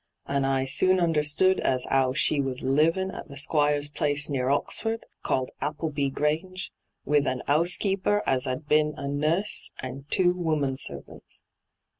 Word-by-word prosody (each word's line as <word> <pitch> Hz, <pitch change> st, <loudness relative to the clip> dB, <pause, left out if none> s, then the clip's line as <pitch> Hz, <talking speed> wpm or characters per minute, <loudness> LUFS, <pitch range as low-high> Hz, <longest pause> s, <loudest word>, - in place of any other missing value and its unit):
And 140 Hz, -1 st, 0 dB
I 135 Hz, -1 st, +1 dB
soon 185 Hz, +8 st, +3 dB
understood 165 Hz, +2 st, +2 dB
as 130 Hz, -1 st, 0 dB
'ow 130 Hz, -1 st, +2 dB
she 145 Hz, +2 st, +1 dB
was 130 Hz, -2 st, -4 dB
living 165 Hz, +8 st, +2 dB
at -, -, -8 dB
the 140 Hz, -3 st, -11 dB
Squire's 145 Hz, 0 st, +1 dB
place 145 Hz, 0 st, 0 dB
near 130 Hz, -2 st, 0 dB
Oxford, 225 Hz, +10 st, -1 dB, 0.2 s
called 130 Hz, -1 st, -1 dB
Appleby 145 Hz, -1 st, -2 dB
Grange, 160 Hz, +7 st, -2 dB, 0.3 s
with 145 Hz, 0 st, +2 dB
an 130 Hz, -1 st, -2 dB
'oasekeeper 190 Hz, +6 st, +1 dB
as 130 Hz, 0 st, +1 dB
'ad 130 Hz, +4 st, -4 dB
been 150 Hz, 0 st, +2 dB
a 140 Hz, -, -5 dB
nUBS, 155 Hz, +8 st, 0 dB
and 135 Hz, +2 st, -7 dB
two 180 Hz, -2 st, +3 dB
woman 155 Hz, -6 st, -1 dB
servants. 70 Hz, -, -6 dB
145 Hz, 150 wpm, -26 LUFS, 135-165 Hz, 0.3 s, soon